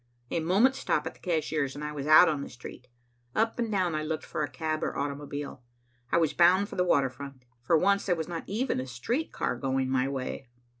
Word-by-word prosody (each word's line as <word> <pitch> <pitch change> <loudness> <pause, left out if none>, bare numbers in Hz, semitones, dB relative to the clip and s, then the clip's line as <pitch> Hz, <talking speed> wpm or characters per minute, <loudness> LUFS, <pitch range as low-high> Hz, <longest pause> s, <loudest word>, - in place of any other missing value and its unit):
A - - +1
moment's 205 +11 +3
stop - - 0
at - - -4
the - - -22
cashier's, 155 -5 -1
and 145 - -6
I 150 - -3
was 145 -1 -5
out 155 +3 +8
on 150 -3 0
the - - -6
street. 125 0 -11 0.5
Up 225 +2 +1
and 230 -2 -1
down 185 -4 +1
I 155 - -1
looked 155 0 -3
for - - -3
cab 155 +1 -3
or - - -2
automobile. 145 -1 -4 0.5
I - - +4
was 160 -3 +2
bound 185 +4 +4
for - - -8
the 180 - +2
water 140 -7 +2
front. 135 -1 -10 0.2
For 165 +7 +3
once, 200 +4 +2
there 180 - +3
was 160 -2 -4
not 170 -2 -5
even 225 - -1
a 130 - -4
street 230 - -2
car - - -1
going 130 +1 -1
my 130 0 +2
way. 135 -1 -4
155 Hz, 230 wpm, -28 LUFS, 135-180 Hz, 0.5 s, out